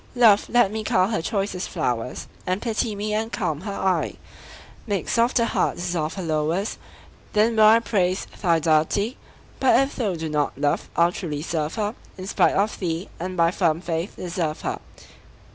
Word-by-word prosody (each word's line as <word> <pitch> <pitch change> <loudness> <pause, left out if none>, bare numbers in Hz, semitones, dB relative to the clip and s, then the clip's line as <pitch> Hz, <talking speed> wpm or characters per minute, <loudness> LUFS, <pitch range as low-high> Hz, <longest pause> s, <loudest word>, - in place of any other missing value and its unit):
Love, 225 -5 +5
let 240 -5 +4
me 220 0 -3
cull 185 -2 +2
her 215 -6 0
choicest 195 0 -2
flowers, 125 -8 -2 0.2
And 185 +2 0
pity 225 -1 -1
me, 210 +1 -2
and 220 +2 -1
calm 165 -8 -2
her 200 +1 -5
eye; 190 -1 0 0.7
Make 200 -3 -1
soft 235 +3 +2
her 235 - +3
heart, - - 0
dissolve 170 -3 -2
her 190 - -4
lowers, 160 +5 -1 0.5
Then 220 +2 +3
will 215 -1 +6
I 220 +1 +8
praise 190 -4 0 0.2
thy 170 -4 +3
deity, 160 - +1 0.4
But 255 -3 +5
if 270 +1 0
thou 210 -7 0
do 160 -1 -4
not, 150 -3 -1
Love, 145 0 0
I'll 170 +1 +4
truly 155 -7 -4
serve 160 -2 -2
her 210 -1 -1 0.2
In 185 - -6
spite 195 - +2
of 205 +2 0
thee, 170 0 -3
and 185 +2 -4
by 170 0 +4
firm 170 -4 +1
faith 170 +1 -3
deserve 170 -3 -3
her. - - -3
185 Hz, 180 wpm, -24 LUFS, 165-215 Hz, 0.7 s, I